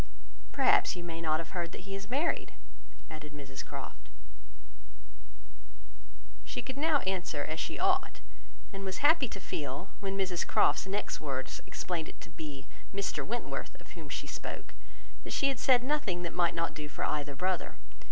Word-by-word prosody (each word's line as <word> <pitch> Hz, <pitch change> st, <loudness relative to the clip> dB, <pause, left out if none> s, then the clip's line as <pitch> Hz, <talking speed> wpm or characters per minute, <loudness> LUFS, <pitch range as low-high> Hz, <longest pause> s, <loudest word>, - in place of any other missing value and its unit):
"Perhaps 270 Hz, -7 st, +5 dB
you 175 Hz, -, -5 dB
may 165 Hz, -1 st, -4 dB
not 155 Hz, -1 st, +3 dB
have 165 Hz, -, -5 dB
heard 170 Hz, -2 st, -1 dB
that -, -, -6 dB
he 195 Hz, +1 st, -6 dB
is 195 Hz, +1 st, -4 dB
married?" 280 Hz, +7 st, +1 dB, 0.5 s
added 155 Hz, -1 st, -8 dB
Mrs 135 Hz, -2 st, -6 dB
Croft. -, -, -7 dB, 2.3 s
She -, -, -3 dB
could 260 Hz, -, -4 dB
now 300 Hz, 0 st, +4 dB
answer 180 Hz, -6 st, 0 dB
as 155 Hz, +2 st, -2 dB
she -, -, -1 dB
ought; 375 Hz, 0 st, +3 dB, 0.5 s
and 195 Hz, 0 st, -4 dB
was 190 Hz, +8 st, -1 dB
happy 300 Hz, -3 st, +7 dB
to 200 Hz, -, -6 dB
feel, 150 Hz, 0 st, -3 dB
when 195 Hz, -1 st, -1 dB
Mrs 185 Hz, -3 st, +1 dB
Croft's -, -, +4 dB
next 200 Hz, +2 st, -1 dB
words 135 Hz, -3 st, -2 dB
explained 170 Hz, -3 st, -2 dB
it -, -, -12 dB
to 170 Hz, -, -9 dB
be 150 Hz, -3 st, -6 dB, 0.3 s
Mr 200 Hz, 0 st, 0 dB
Wentworth 240 Hz, +2 st, -3 dB
of -, -, -15 dB
whom -, -, -8 dB
she -, -, -2 dB
spoke, -, -, -5 dB, 0.5 s
that -, -, -4 dB
she 275 Hz, -, +4 dB
had 265 Hz, -3 st, -1 dB
said 250 Hz, -1 st, +6 dB
nothing 250 Hz, -11 st, +1 dB
which 170 Hz, -, -1 dB
might 175 Hz, -1 st, +3 dB
not 165 Hz, -2 st, +1 dB
do 155 Hz, -1 st, -5 dB
for -, -, -3 dB
either 145 Hz, -1 st, -1 dB
brother. 180 Hz, +4 st, 0 dB
180 Hz, 170 wpm, -33 LUFS, 155-230 Hz, 2.3 s, happy